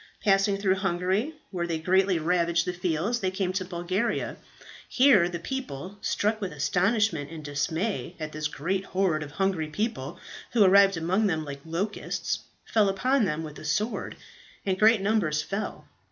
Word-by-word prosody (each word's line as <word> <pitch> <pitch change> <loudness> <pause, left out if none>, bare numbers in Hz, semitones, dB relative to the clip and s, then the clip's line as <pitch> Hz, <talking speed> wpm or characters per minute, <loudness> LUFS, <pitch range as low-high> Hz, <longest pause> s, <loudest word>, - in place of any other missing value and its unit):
"Passing 195 0 +3
through 195 -1 +1
Hungary, 190 - 0 0.2
where 175 -3 -2
they 165 -1 -1
greatly 185 +3 +2
ravaged 170 +1 +1
the 180 - -2
fields, 180 +6 -1
they 190 - 0
came 185 -1 -2
to 185 0 -1
Bulgaria. 185 +5 -2 0.5
Here 245 -10 +5
the 175 - -4
people, 195 - -6
struck 215 +1 0
with 195 - -3
astonishment 180 +1 +1
and 155 -2 -8
dismay 160 +7 -2
at 155 -1 -4
this 155 0 -2
great 185 +6 -2
horde 185 -5 0
of 145 -1 -7
hungry 190 -4 0
people 215 +10 -3 0.3
who 230 -4 +6
arrived 195 -1 +6
among 185 +6 +1
them 160 -4 -1
like 140 -1 -7
locusts, 180 +6 -2 0.3
fell 210 -3 +3
upon 250 +5 +2
them 160 -3 -2
with 150 -1 -8
the - - -10
sword, 205 +10 -1 0.5
and 190 -1 0
great 220 -1 +5
numbers 190 -8 +1
fell. 200 +5 -5
185 Hz, 165 wpm, -27 LUFS, 165-205 Hz, 0.5 s, who